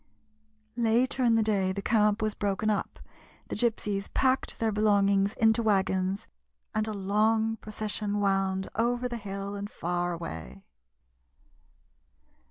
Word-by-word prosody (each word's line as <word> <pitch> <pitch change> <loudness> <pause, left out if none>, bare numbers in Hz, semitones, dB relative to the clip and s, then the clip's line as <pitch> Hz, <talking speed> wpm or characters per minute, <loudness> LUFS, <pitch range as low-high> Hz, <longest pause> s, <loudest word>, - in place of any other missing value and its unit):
Later 240 +3 +2
in 230 -2 +4
the 225 - +3
day 195 -3 +1
the 200 +1 -4
camp 210 0 +2
was 215 -1 0
broken 205 +2 0
up, 205 - -3 0.5
the - - -3
Gypsies 210 -4 -1
packed 260 0 +1
their 225 -1 0
belongings 200 -1 +3
into 220 +1 +3
wagons, 190 -2 +1 0.5
and 215 0 0
a - - -2
long 215 +3 +1
procession 210 -1 -3
wound 195 -1 +1
over 245 +2 0
the 240 -1 -4
hill 200 -1 -5
and 200 0 -5
far 175 -1 -2
away. 80 - -7
210 Hz, 130 wpm, -28 LUFS, 195-220 Hz, 0.5 s, in